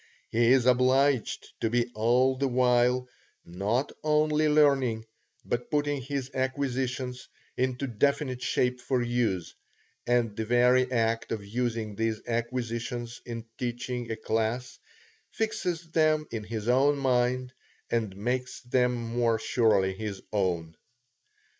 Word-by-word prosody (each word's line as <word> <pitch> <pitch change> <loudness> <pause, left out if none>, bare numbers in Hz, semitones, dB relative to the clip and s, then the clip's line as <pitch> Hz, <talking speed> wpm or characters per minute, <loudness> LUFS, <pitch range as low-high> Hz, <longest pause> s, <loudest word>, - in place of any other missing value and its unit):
He 120 +1 +3
is 130 -2 +4
obliged 130 +1 +2
to 115 - 0
be 120 +1 0
all 125 +4 +3
the 135 +1 0
while, 125 0 +2 0.4
not 105 +10 -1
only 155 0 +2
learning, 135 -7 +3 0.4
but 120 0 -2
putting 145 -1 0
his 135 0 -4
acquisitions 130 -1 -2 0.3
into 130 +1 -1
definite 130 +1 0
shape 125 +1 0
for 130 -1 0
use, 115 -8 -1 0.5
and 120 -3 +2
the 110 - -2
very 125 +2 +3
act 115 -1 0
of 105 -3 -3
using 115 -1 -2
these 110 0 -1
acquisitions 120 0 -3
in 115 -1 -5
teaching 120 0 -3
a 115 - -2
class, 115 +3 -2 0.5
fixes 175 -7 -3
them 155 -1 +3
in 110 -2 -4
his 110 0 -5
own 135 +4 +4
mind, 125 -1 +1 0.4
and 110 -5 -1
makes 125 +4 -2
them 125 0 +1
more 115 -1 0
surely 110 -5 +2
his 100 0 -5
own. 85 -5 -1
125 Hz, 125 wpm, -28 LUFS, 115-130 Hz, 0.5 s, is